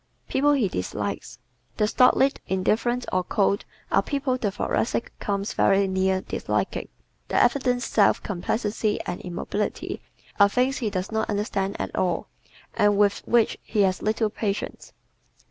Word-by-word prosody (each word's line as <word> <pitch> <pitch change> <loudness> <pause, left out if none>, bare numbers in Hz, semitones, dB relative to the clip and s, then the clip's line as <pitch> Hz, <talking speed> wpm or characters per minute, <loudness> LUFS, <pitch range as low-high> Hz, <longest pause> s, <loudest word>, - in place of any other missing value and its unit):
People 290 +2 +3
He 255 -8 +2
Dislikes 100 - -4 0.4
¶ - - -33
The 210 - +3
stolid, 260 +4 +4
indifferent 230 +6 0
or 185 - +2
cold 200 +2 +1 0.3
are - - +4
people 275 -3 -1
the 230 -5 -1
Thoracic 225 +4 -1
comes 200 0 -2
very 195 0 +3
near 190 0 +1
disliking. - - -2 0.4
Their - - +1
evident 250 -3 +2
self 205 -3 +3
complacency 210 +2 -1
and 175 - -5
immobility 185 +4 -3 0.4
are 200 0 +7
things 255 +5 +1
he 225 - -1
does 190 +1 -3
not 220 0 -1
understand 200 -1 -1
at - - -4
all 180 -2 0 0.4
and 205 -2 +3
with 200 -1 +3
which 235 -2 +3
he 215 - 0
has 185 -2 +2
little 215 0 0
patience. 205 -2 -4
205 Hz, 145 wpm, -25 LUFS, 195-235 Hz, 0.4 s, are